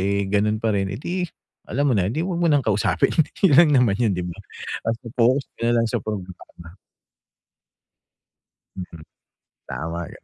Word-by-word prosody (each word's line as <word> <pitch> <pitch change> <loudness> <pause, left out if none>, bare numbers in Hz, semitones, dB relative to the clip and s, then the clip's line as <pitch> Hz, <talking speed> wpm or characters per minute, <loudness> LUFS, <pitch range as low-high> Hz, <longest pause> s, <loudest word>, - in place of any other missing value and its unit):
eh 100 +1 0
ganun 105 +2 +1
pa 110 -1 0
rin, 95 -1 0
eh 100 - -5
‘di 180 +7 -3 0.5
alam 145 +2 +1
mo - - +2
na, 95 0 +1
‘di 155 +8 -1
‘wag 175 -2 -2
mo 170 - +3
nang 145 -3 +3
kausapin. 105 -1 +2 0.3
Yun 150 - +4
lang 165 -1 +7
naman 110 -5 +2
yun 115 -3 +3
‘di 90 - -2
ba. 85 - -6 0.5
Basta 115 +1 -3
focus 130 +3 +3
ka 115 0 0
na - - +3
lang 115 - +1
sa - - -1
programa. 90 -3 -8 2.0
Mhm, 85 -4 -8 0.7
tama 85 +6 -4
‘yan. - - -14
105 Hz, 175 wpm, -23 LUFS, 95-125 Hz, 2.0 s, lang